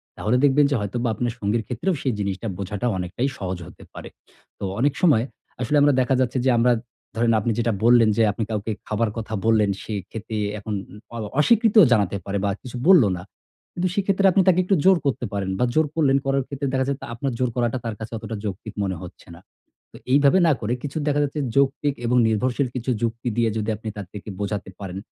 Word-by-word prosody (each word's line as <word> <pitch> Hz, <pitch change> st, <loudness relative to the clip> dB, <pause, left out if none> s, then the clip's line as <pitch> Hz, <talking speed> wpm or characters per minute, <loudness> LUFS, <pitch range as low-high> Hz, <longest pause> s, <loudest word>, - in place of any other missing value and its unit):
তাহলে 110 Hz, +4 st, 0 dB
দেখবেন 145 Hz, +1 st, +5 dB
যে -, -, +2 dB
হয়তোবা 120 Hz, +4 st, -2 dB
আপনার 120 Hz, +1 st, -2 dB
সঙ্গীর 110 Hz, +2 st, 0 dB
ক্ষেত্রেও 150 Hz, -, -1 dB
সেই 130 Hz, -, 0 dB
জিনিসটা 100 Hz, +2 st, -3 dB
বোঝাটা 100 Hz, +4 st, -3 dB
অনেকটাই 90 Hz, +9 st, -2 dB
সহজ 95 Hz, -2 st, -4 dB
হতে -, -, -14 dB
পারে। -, -, -9 dB, 0.5 s
তো -, -, -7 dB, 0.2 s
অনেক 140 Hz, +3 st, +2 dB
সময় 145 Hz, -11 st, +4 dB, 0.4 s
আসলে 145 Hz, +5 st, +1 dB
আমরা 145 Hz, 0 st, +5 dB
দেখা 130 Hz, +1 st, +1 dB
যাচ্ছে 130 Hz, 0 st, 0 dB
যে, 130 Hz, -, +4 dB
আমরা 120 Hz, +1 st, +4 dB, 0.4 s
ধরেন 115 Hz, +1 st, +2 dB
আপনি 115 Hz, +3 st, -1 dB
যেটা 115 Hz, 0 st, +1 dB
বললেন 120 Hz, -2 st, +6 dB
যে, 115 Hz, -, +3 dB
আপনি 110 Hz, -, -3 dB
কাউকে 110 Hz, 0 st, -2 dB, 0.2 s
খাবার 110 Hz, +1 st, 0 dB
কথা 110 Hz, -1 st, -5 dB
বললেন 110 Hz, -2 st, +3 dB
সে 110 Hz, -, -6 dB, 0.2 s
খেতে 110 Hz, 0 st, -6 dB, 0.2 s
এখন 105 Hz, +1 st, -5 dB, 0.2 s
উ -, -, -13 dB, 0.2 s
অ -, -, -4 dB, 0.2 s
অস্বীকৃতও 220 Hz, +3 st, +5 dB
জানাতে 100 Hz, -3 st, +1 dB
পারে 100 Hz, 0 st, -2 dB
বা 100 Hz, -, +1 dB
কিছু 125 Hz, -1 st, -8 dB
বলল 185 Hz, -7 st, +8 dB
না। 90 Hz, -, -8 dB, 0.5 s
কিন্তু 180 Hz, +1 st, -1 dB
সেক্ষেত্রে 195 Hz, 0 st, +1 dB
আপনি 190 Hz, -, +4 dB
তাকে 185 Hz, 0 st, +5 dB
একটু 195 Hz, +2 st, +2 dB
জোর 190 Hz, -2 st, +7 dB
করতে 135 Hz, -3 st, 0 dB
পারেন। 95 Hz, -1 st, -2 dB
বা 125 Hz, -, +3 dB
জোর 155 Hz, 0 st, +4 dB
করলেন 140 Hz, -4 st, +3 dB
করার 135 Hz, 0 st, +1 dB
ক্ষেত্রে 140 Hz, 0 st, -4 dB
দেখা 130 Hz, 0 st, +1 dB
যায় 140 Hz, -1 st, -1 dB, 0.2 s
আপনার 130 Hz, +2 st, -3 dB
জোর 125 Hz, -1 st, +1 dB
করাটা 120 Hz, 0 st, 0 dB
তার 115 Hz, -, -3 dB
কাছে 110 Hz, +1 st, -7 dB
অতটা 110 Hz, 0 st, -6 dB
যৌক্তিক 105 Hz, +1 st, -5 dB
মনে 95 Hz, -1 st, -2 dB
হচ্ছে 90 Hz, -, -12 dB
না। 85 Hz, -, -15 dB, 0.5 s
তো -, -, -11 dB
এইভাবে 140 Hz, +6 st, +5 dB
না -, -, +5 dB
করে, 115 Hz, +3 st, -1 dB
কিছু 145 Hz, +2 st, -5 dB
দেখা 145 Hz, 0 st, +2 dB
যাচ্ছে 145 Hz, +1 st, -3 dB, 0.2 s
যৌক্তিক 140 Hz, +1 st, +2 dB
এবং 125 Hz, +1 st, +2 dB
নির্ভরশীল 125 Hz, +5 st, 0 dB
কিছু 125 Hz, +1 st, -2 dB
যুক্তি 115 Hz, +1 st, -2 dB
দিয়ে 115 Hz, -1 st, +3 dB
যদি 110 Hz, 0 st, -2 dB
আপনি 110 Hz, +1 st, -6 dB
তার 100 Hz, -, -6 dB
থেকে 105 Hz, 0 st, -9 dB
বোঝাতে 100 Hz, -1 st, -3 dB
পারেন, 95 Hz, -2 st, -6 dB
120 Hz, 215 wpm, -23 LUFS, 105-140 Hz, 0.5 s, বলল